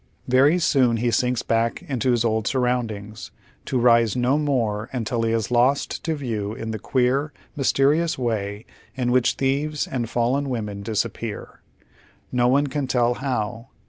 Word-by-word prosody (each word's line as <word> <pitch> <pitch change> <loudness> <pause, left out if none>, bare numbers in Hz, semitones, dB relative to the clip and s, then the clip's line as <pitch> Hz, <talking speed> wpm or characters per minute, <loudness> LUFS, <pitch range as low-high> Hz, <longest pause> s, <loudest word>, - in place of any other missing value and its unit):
Very 135 +6 +4
soon 130 -9 +3
he 120 +1 0
sinks 125 +1 +1
back 115 +6 0
into 130 -7 -1
his 120 -1 +2
old 110 -1 0
surroundings, 115 -5 -2 0.4
to 130 - -1
rise 115 -2 +4
no 125 +4 +2
more 120 -7 -1
until 120 -2 -2
he 115 0 0
is 115 0 -1
lost 125 +4 +1
to 160 -1 0
view 110 -7 -3
ill 110 0 -4
the 110 - -4
queer, 130 +6 0 0.2
mysterious 145 +4 +2
way 110 -3 -3 0.3
in 125 -2 -1
which 125 -1 +3
thieves 140 +3 -1
and 120 -3 -3
fallen 130 +5 0
women 105 -5 -4
disappear. 110 +1 -4 0.7
No 125 -1 +2
one 140 +3 +3
can 140 0 -3
tell 120 -1 +2
how. 120 -3 -3
125 Hz, 155 wpm, -23 LUFS, 115-135 Hz, 0.7 s, Very